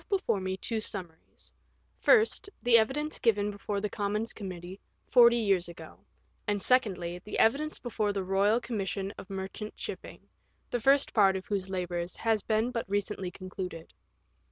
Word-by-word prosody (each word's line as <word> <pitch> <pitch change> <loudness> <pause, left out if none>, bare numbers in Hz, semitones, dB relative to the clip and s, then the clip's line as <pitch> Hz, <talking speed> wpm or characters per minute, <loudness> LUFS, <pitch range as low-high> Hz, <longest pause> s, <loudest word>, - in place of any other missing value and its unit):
before 385 - +1
me 190 0 -2
two 225 +3 -2
summaries: 175 -6 -5 0.5
First, 440 -3 +4
the 245 -1 +5
evidence 295 +7 -1
given 210 -3 +2
before 205 0 -3
the 210 - -1
Commons* 210 +2 -2
Committee 185 -1 -7 0.3
forty 235 -1 +6
years 195 -6 +1
ago; 165 -2 -11 0.5
and, 205 0 +1
secondly, 185 -8 +1
the 210 - -5
evidence 290 +7 +2
before 215 -4 -1
the 200 -1 -2
Eoyal 200 +5 +2
Commission 195 -3 -3
of - - -10
Merchant 195 +2 -6
Shipping, - - -7 0.4
the 245 - 0
first 275 +4 +3
part 195 -3 +5
of 190 -1 -4
whose 195 -2 -2
labours 175 -1 -3
has 225 -2 +1
been 220 +4 0
but 230 -5 -4
recently 200 -2 -2
concluded. 185 -3 -7
205 Hz, 155 wpm, -29 LUFS, 190-230 Hz, 0.5 s, forty